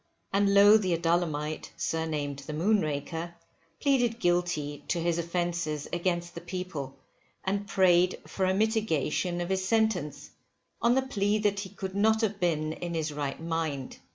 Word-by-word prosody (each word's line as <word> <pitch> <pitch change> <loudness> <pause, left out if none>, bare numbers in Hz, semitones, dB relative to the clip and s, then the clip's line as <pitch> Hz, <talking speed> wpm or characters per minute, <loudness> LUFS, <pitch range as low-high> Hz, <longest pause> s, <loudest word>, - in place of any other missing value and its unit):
And 200 0 +3
Lowe 205 +2 +8
the 185 -5 0
Adullamite, 165 -3 -1
surnamed 150 -3 -2
the 150 +2 -7
moonraker, 165 -2 0 0.4
pleaded 245 -5 +2
guilty 175 -6 0
to 170 - 0
his 170 0 0
offences 170 -3 -2
against 175 0 -1
the 170 - -7
people, 175 -8 -5 0.5
and 200 +1 -1
prayed 180 -2 +4
for 190 -1 -1
a 185 - +2
mitigation 190 - 0
of 175 - -3
his 190 0 0
sentence, 190 -8 0 0.5
on 235 +1 +4
the 265 - +2
plea 210 -5 +1
that 205 -2 +1
he 195 -1 -5
could 190 -1 -6
not 220 +3 +3
have 210 -2 -1
been 155 -3 0
in 170 0 -5
his 155 -2 -2
right 145 -2 -3
mind. 160 -5 -3
175 Hz, 155 wpm, -29 LUFS, 160-200 Hz, 0.5 s, Lowe